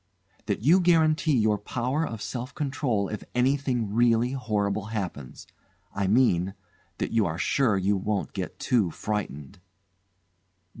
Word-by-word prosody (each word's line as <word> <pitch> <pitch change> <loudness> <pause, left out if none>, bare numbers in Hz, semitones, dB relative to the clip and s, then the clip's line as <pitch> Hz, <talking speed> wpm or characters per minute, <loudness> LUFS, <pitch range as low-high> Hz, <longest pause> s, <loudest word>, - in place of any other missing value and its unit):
"That 105 0 -2
you 165 +8 +6
guarantee 160 -4 +3
your 105 -2 +2
power 125 +8 -2
of 115 -2 -6
self 125 +6 -5
control 135 -8 -1
if 105 - -6
anything 125 -4 +1
really 120 +1 +3
horrible 105 -6 -1
happens. 95 - -5 0.5
I 100 -1 -1
mean 95 -4 +2 0.4
that - - -3
you 115 -4 +2
are 80 -1 -3
sure 110 +2 +2
you 95 +2 +1
won't 100 +1 -2
get - - -5
too 110 -8 +1
frightened." 95 -4 -5
110 Hz, 135 wpm, -26 LUFS, 100-130 Hz, 0.5 s, you